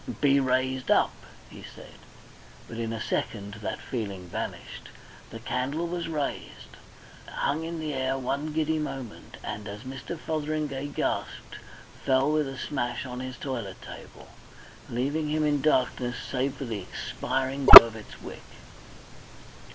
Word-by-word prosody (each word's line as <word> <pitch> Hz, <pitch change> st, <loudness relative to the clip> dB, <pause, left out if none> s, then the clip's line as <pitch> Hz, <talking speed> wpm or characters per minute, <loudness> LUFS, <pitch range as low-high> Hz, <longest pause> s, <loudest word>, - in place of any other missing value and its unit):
"Be 140 Hz, -1 st, +4 dB
raised 130 Hz, 0 st, -1 dB
up," -, -, +3 dB, 0.3 s
he -, -, -13 dB
said. -, -, -14 dB, 0.7 s
But 115 Hz, -, -8 dB
in 115 Hz, -1 st, -3 dB
a 115 Hz, -, -4 dB
second 105 Hz, -2 st, -4 dB
that -, -, -4 dB
feeling 100 Hz, -7 st, -6 dB
vanished. -, -, -7 dB, 0.4 s
The 115 Hz, -, -8 dB
candle 135 Hz, +7 st, -3 dB
was 170 Hz, 0 st, -4 dB
raised, 150 Hz, -4 st, -5 dB, 0.5 s
hung 150 Hz, +3 st, -2 dB
in 165 Hz, 0 st, -5 dB
the 155 Hz, -2 st, -4 dB
air 130 Hz, 0 st, -1 dB
one 140 Hz, +4 st, -3 dB
giddy 155 Hz, 0 st, -1 dB
moment, 135 Hz, -6 st, -7 dB
and 105 Hz, 0 st, -6 dB
as 100 Hz, +1 st, -8 dB
Mr. 130 Hz, +6 st, -7 dB
Fotheringay 150 Hz, -3 st, -3 dB
gasped, 145 Hz, -, -4 dB, 0.5 s
fell 135 Hz, +2 st, +2 dB
with 155 Hz, -2 st, +1 dB
a 135 Hz, 0 st, -7 dB
smash 120 Hz, -3 st, -3 dB
on 125 Hz, -1 st, -7 dB
his 130 Hz, -1 st, -7 dB
toilet 120 Hz, -9 st, -6 dB
table, -, -, -12 dB, 0.6 s
leaving 145 Hz, +6 st, -2 dB
him 155 Hz, 0 st, 0 dB
in 145 Hz, -2 st, +1 dB
darkness 125 Hz, -4 st, 0 dB
save 135 Hz, +1 st, -3 dB
for 135 Hz, -, -6 dB
the 110 Hz, -4 st, -5 dB
expiring 130 Hz, +8 st, -4 dB
glow -, -, +15 dB
of 115 Hz, -1 st, -8 dB
its 110 Hz, -, -12 dB
wick. -, -, -9 dB
130 Hz, 145 wpm, -26 LUFS, 120-150 Hz, 0.7 s, glow